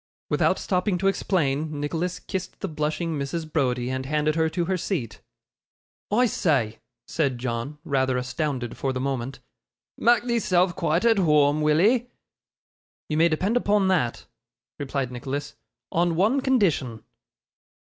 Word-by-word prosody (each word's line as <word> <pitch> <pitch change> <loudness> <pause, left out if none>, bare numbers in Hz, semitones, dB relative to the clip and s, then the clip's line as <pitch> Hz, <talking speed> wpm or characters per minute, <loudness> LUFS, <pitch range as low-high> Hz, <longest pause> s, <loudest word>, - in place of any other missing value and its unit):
Without - - +2
stopping 185 0 0
to 190 - -3
explain, 155 -6 0
Nicholas 165 +5 -2
kissed 185 -1 -6
the 195 - -2
blushing 155 0 -2
Mrs. 150 +4 -3
Browdie, 125 -4 0
and 130 0 -3
handed 150 +1 +1
her 160 0 +1
to 170 +2 -1
her 190 +2 0
seat. 165 - -3 0.9
'I 240 +4 +4
say,' 135 - 0 0.3
said 140 -6 -1
John, 120 +4 -4
rather 130 -5 +1
astounded 130 -1 -3
for 135 -1 -1
the 130 - -3
moment, 130 -1 -3 0.6
'mak' 240 +1 +4
theeself 190 -7 +1
quite 170 +5 0
at 225 -2 +5
whoam, 150 -3 +3
will 150 0 +3
'ee?' 235 +6 +3 1.0
'You 155 - 0
may 165 +1 +5
depend 185 +8 0
upon 205 -4 +2
that,' 155 -11 0 0.5
replied 135 -2 -2
Nicholas; 140 +4 -4 0.4
'on 170 0 +1
one 220 +10 +2
condition. 175 - +1
155 Hz, 140 wpm, -25 LUFS, 135-185 Hz, 1.0 s, at